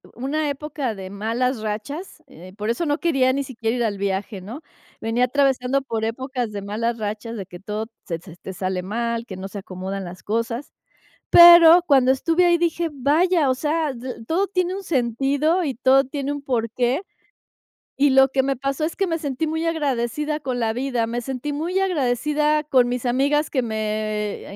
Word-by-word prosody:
una 290 +5 -1
época 280 -4 -4
de 190 -1 -8
malas 225 +5 -1
rachas, 280 - -5
eh, 180 +3 -13
por 210 +1 -3
eso 235 +9 -1
no 290 -1 +1
quería 270 -6 +2
ni 280 +1 -1
siquiera 230 -3 -3
ir 240 - 0
al 210 -3 -1
viaje, 195 +1 -3
¿no? 225 - -8 0.4
Venía 230 +2 +1
atravesando 270 0 +1
por 225 -4 -3
épocas 250 0 -3
de 205 -1 -5
malas 225 +4 -2
rachas, 215 +2 -4
de 200 -4 -5
que 180 -1 -11
todo 210 +3 -4 0.2
se 165 -2 -3
se 170 -1 -13
te 190 - -8
sale 185 0 -3
mal, 230 +3 -2
que 190 -5 -8
no 190 - -6
se 200 +1 -7
acomodan 190 0 -6
las 175 0 -10
cosas. 230 +4 -3 0.6
Pero 345 0 +9
cuando 265 -4 +4
estuve 330 +6 +2
ahí, 345 -1 +4
dije: 340 0 0
"Vaya, 300 +4 +2
o 260 - +3
sea, 305 +2 -1
d 245 -1 -7
todo 365 +8 +1
tiene 365 -1 -1
un 395 - -5
sentido 280 - +1
y 275 -5 -2
todo 265 +2 +4
tiene 280 +1 -3
un 290 -1 -5
porqué". 245 - -1 1.0
Y 285 +1 +4
lo 270 0 +6
que 265 0 0
me 275 -1 -1
pasó 275 +3 -2
es 320 - -2
que 390 - +1
me 330 -2 -1
sentí 285 +1 -2
muy 320 +1 -2
agradecida 300 -1 -1
con 255 -3 -3
la 225 -1 0
vida, 245 -2 -1
me 240 +1 -3
sentí 265 +3 -4
muy 340 +6 -1
agradecida 300 -2 +1
con 255 -4 +3
mis 250 0 -3
amigas 280 +5 +1
que 260 - 0
me, 215 -2 -3
255 Hz, 190 wpm, -22 LUFS, 225-295 Hz, 1.0 s, Pero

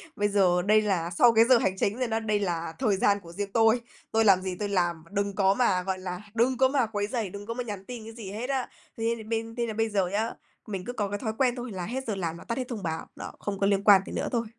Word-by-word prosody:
Bây 205 0 +1
giờ 185 -3 +3
đây 215 +3 +4
là 180 -5 0
sau 235 +7 +5
cái 225 +1 +6
giờ 255 -1 +6
hành 190 -3 0
chính 210 +5 0
rồi 250 - 0
đó, 225 0 0
đây 215 -2 0
là 170 -4 -2
thời 210 -7 +2
gian 200 +1 +3
của 170 -3 -13
riêng 200 +2 -4
tôi. 225 +1 +4 0.3
Tôi 225 0 +3
làm 190 -2 +6
gì 185 -1 -3
tôi 205 -1 -2
làm, 175 -4 0
đừng 200 0 -1
có 195 -1 +4
mà, 195 -6 +2
gọi 190 0 -2
là, 180 0 -5
đừng 240 +2 +2
có 260 0 +5
mà 265 -3 +2
quấy 205 -2 -2
rầy, 225 -5 -2
đừng 200 +2 -8
có 230 - -4
mà 250 +1 -3
nhắn 205 -4 -6
tin 240 -3 -7
cái 225 +1 -9
gì 210 -4 -8
hết 235 +6 -5
á. 265 -2 0 0.3
Thế 230 +1 0
là 220 - -9
bên 225 0 -3
thế 240 -1 -1
là 220 - -3
bây 225 +1 0
giờ 195 -3 +1
nhá, 215 +5 -1 0.4
mình 195 -3 -5
cứ 245 - -4
có 205 -4 -1
cái 205 - -3
thói 220 -3 -2
quen 255 -2 +2
thôi 245 -2 -6
là 180 -2 -4
hết 260 +4 -4
giờ 210 - -1
làm 170 -3 -3
và - - -11
tắt 230 - -3
hết 255 -1 -3
thông 220 -6 -5
báo, 160 -1 -3
đó, - - -7
không 200 -1 -4
có 195 - +2
liên 200 -1 +2
quan 200 -3 +7
gì - - -8
nữa - - -2
thôi. 235 -2 0
205 Hz, 305 wpm, -27 LUFS, 190-230 Hz, 0.4 s, quan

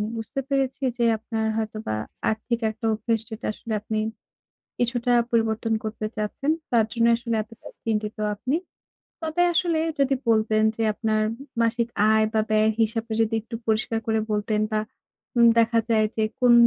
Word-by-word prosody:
বুঝতে 225 +5 -4
পেরেছি 270 0 0
যে 235 - +1
আপনার 220 0 -3
হয়তোবা 215 - -3 0.3
আর্থিক 230 +2 -1
একটা 225 +1 -7
অভ্যেস, 225 +1 0
যেটা 220 - -7
আসলে 225 0 -6
আপনি 215 0 -3 0.8
কিছুটা 245 0 +1 0.2
পরিবর্তন 225 0 +1
করতে 215 0 -4
চাচ্ছেন। 215 +8 -1 0.2
তার 225 -2 +4
জন্যই 235 0 +4
আসলে 235 -1 -2
এতটা 225 +1 -15 0.2
চিন্তিত 215 -1 -1 0.2
আপনি। 255 +8 -1 0.7
তবে 320 +2 +1
আসলে 335 -1 +2 0.2
যদি 275 0 +3
বলতেন, 215 -1 +3
যে 225 - -1
আপনার 215 -1 0
উম - - -7 0.3
মাসিক 230 +1 +1 0.2
আয় 220 0 +4
বা 220 - +3
ব্যয়ের 215 0 +4
হিসাবটা 225 0 0
যদি 225 0 0
একটু 230 +1 -9
পরিষ্কার 220 +1 +1
করে 220 0 +2
বলতেন 210 0 0
বা 215 - +1 0.6
উম 235 0 +7
দেখা 230 0 +4
যায় 215 -1 +4
যে 220 - +1 0.2
কোন 245 -1 +6
225 Hz, 160 wpm, -25 LUFS, 220-235 Hz, 0.8 s, উম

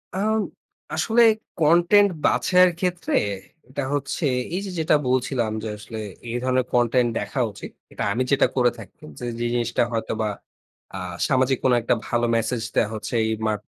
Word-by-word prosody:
আ - - -1 0.8
আসলে, 235 +1 +2 0.4
কনটেন্ট 175 +6 +5 0.2
বাছায়ের 180 0 +4
ক্ষেত্রে 180 -1 -2 0.6
এটা 140 +2 -3
হচ্ছে, 145 +3 -2 0.3
এই - - 0
যে, - - -5
যেটা 160 -1 +3
বলছিলাম 125 -3 0
যে, - - -3
আসলে 110 +2 -8 0.3
এই 120 - -2
ধরনের 130 -1 +1
কনটেন্ট 120 0 +3
দেখা 105 +6 -4
উচিত। 100 - -10 0.2
এটা - - -4
আমি 130 - 0
যেটা 140 - +4
করে 125 -2 +3
থাকি - - -13 0.2
যে, - - -5
যে 120 - -1
জিনিসটা 120 -1 +1
হয়তো 115 -1 -2
বা 110 - 0 0.7
আ - - -4 0.3
সামাজিক 130 0 +2
কোন 130 - +4
একটা 115 - +2
ভালো 120 0 +1
মেসেজ 115 +1 -1
দেওয়া 110 - +2
হচ্ছে 110 - -6
এই - - 0 0.2
মা 110 - +2
125 Hz, 165 wpm, -23 LUFS, 115-150 Hz, 0.8 s, কনটেন্ট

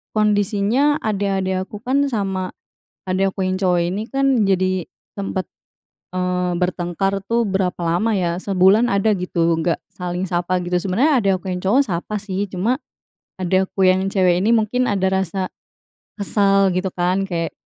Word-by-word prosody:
kondisinya, 215 +6 +2
adik-adik 195 -3 -1
aku 210 0 -10
kan, 270 +3 +2
sama 195 -6 -2 0.6
adik 190 +1 +1
aku 190 - -2
yang 185 - 0
cowok 180 -2 +2
ini, 195 +5 -2
kan 270 -4 +2
jadi 185 -1 +1 0.3
sempat, 195 -2 -3 0.7
eee, 180 0 0
bertengkar 180 +2 -1
tuh, 235 +2 +1
berapa 190 -2 -1
lama, 175 +7 +1
ya. 175 -3 0
Sebulan 195 +4 +4
ada, 200 +2 +2
gitu, 170 -2 +1
nggak 165 +1 0 0.2
saling 180 +1 -3
sapa, 175 +1 0
gitu. 175 0 -3
Sebenarnya, 230 - +2
adik 195 -1 +3
aku 190 - -4
yang - - -3
cowok 235 +9 +4
sapa, 195 +3 -3
sih. 200 -1 -2
Cuma, 200 +6 -1 0.7
adik 185 +1 +2
aku 190 -1 +2
yang 185 +1 +2
cewek 185 -3 +3
ini 215 - +2
mungkin 235 +3 +1
ada 195 -2 +1
rasa 190 0 -1 0.7
kesal, 195 -1 +2
gitu 185 +1 -1
kan. 185 +2 0
Kayak, 165 -2 -2
190 Hz, 155 wpm, -20 LUFS, 180-205 Hz, 0.7 s, Sebulan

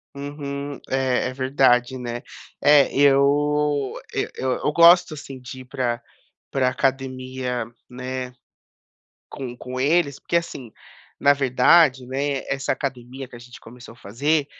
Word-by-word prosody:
Uhum. 140 0 -5
É, 130 -2 +1
é - - -7
verdade, 130 -1 +2
né. 120 -1 -5 0.4
É, 145 -2 +5
eu 145 0 +3 0.2
eu - - -1
eu 130 - -1
eu - - +2
gosto, 170 0 +6
assim, 140 -3 -9
de 130 +1 -9
ir - - -13
para 125 -3 -2 0.5
para 130 -2 +1
a - - +2
academia, 130 -2 -2 0.2
né, 130 0 -5 1.0
com 125 -2 -7
com 130 +1 -6
eles, 145 -1 +2
porque, 170 - -1
assim, 135 -8 -4 0.5
na 145 - +5
verdade, 135 +1 +4
né, 135 +1 -2
essa 135 -1 -1
academia 130 -1 -5
que 120 - -13
a - - -10
gente 120 +1 -13
começou 120 0 -13
a - - -19
fazer 140 +8 0
130 Hz, 145 wpm, -23 LUFS, 125-145 Hz, 1.0 s, gosto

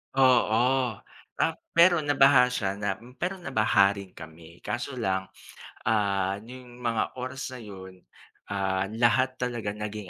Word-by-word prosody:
Oo 125 -1 +3 0.4
ta - - +1 0.2
pero 170 0 +6
nabaha 140 -3 +5
siya 100 -6 -2
na 100 -2 -1 0.2
pero 185 +3 -2
nabaha 110 - +2
rin 100 -2 -9
kami 80 +1 -12
kaso 125 +2 -4
lang, 95 -5 -1 0.6
ah, 100 -3 +1
n'yong 125 +1 -12
mga 115 -2 -1
oras 130 +1 -5
na 125 - -8
yun, 95 -3 -11 0.5
ah, 95 -1 -1
lahat 120 +3 +2
talaga 120 -4 -3
naging 105 -2 -6
115 Hz, 130 wpm, -27 LUFS, 100-130 Hz, 0.6 s, pero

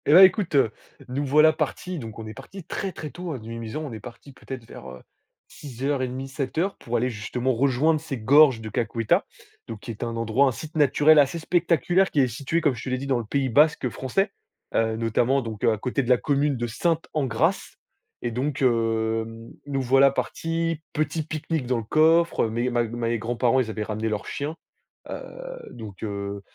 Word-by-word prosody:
Et 145 - +5
bah 185 +4 +10
écoute, 185 -3 +4
heu, 135 -6 +4 0.4
nous 135 +3 -2
voilà 150 +3 +5
partis, 180 +2 -3
donc 110 -4 -8
on 110 - -7
est 110 - -7
parti 175 - -10
très, 195 +4 -4
très 155 -4 -7
tôt 175 -5 -5
de 110 -2 -11
Mimizan, 115 +5 -5
on 140 -6 -6
est 110 - -6
parti 120 +6 -12
peut-être 130 -2 -8
vers, 65 - -10
heu, 65 0 -11 0.5
06:30-07:00 135 - -3
pour 120 +1 -2
aller 125 +2 0
justement 125 +4 -2
rejoindre 140 +5 +2
ces 150 -3 -5
gorges 135 +1 +5
de 110 - -6
Kakuetta, 115 0 0 0.4
donc 110 -2 -7
qui 125 - -6
est 110 - -6
un 115 -1 -3
endroit, 115 +4 +2
un - - +2
site 155 +6 -9
naturel 150 +1 +5
assez 140 +3 +3
spectaculaire 175 +2 +2
qui 150 - 0
est 130 - +3
situé 140 +7 -2
comme 145 -4 +2
je 115 - -8
te - - -4
l'ai 130 - 0
dit 135 - -5
dans 135 -3 +1
le 115 - -5
pays 135 +4 0
basque 145 0 +3
français, 195 - -1 0.4
heu, 110 0 +1
notamment 120 +4 +1
donc 110 -4 -7
à 110 -1 +3
côté 125 +5 -1
de 125 - -5
la 125 - +6
commune 140 +1 +1
de 120 - -2
Sainte-Engrâce 145 -1 -1 0.5
et 120 - -1
donc 135 +4 -2
hem, 115 -1 0 0.2
nous 135 -1 -1
voilà 135 +2 +5
partis, 165 +3 -2
petit 155 +1 -1
pique-nique 155 -2 -3
dans 125 -1 +1
le 115 - -3
coffre, 160 +3 +3
mes 120 +3 -1
ma 120 0 +2
mes 115 0 -2
grands-parents 120 +3 +1
ils 120 -3 0
avaient 110 -1 -3
ramené 110 +1 -2
leur 105 -1 -3
chien, 145 +3 -4 0.5
heu, - - -3 0.6
donc 105 -5 -10
heu, 100 -1 -4
130 Hz, 195 wpm, -25 LUFS, 115-150 Hz, 0.6 s, bah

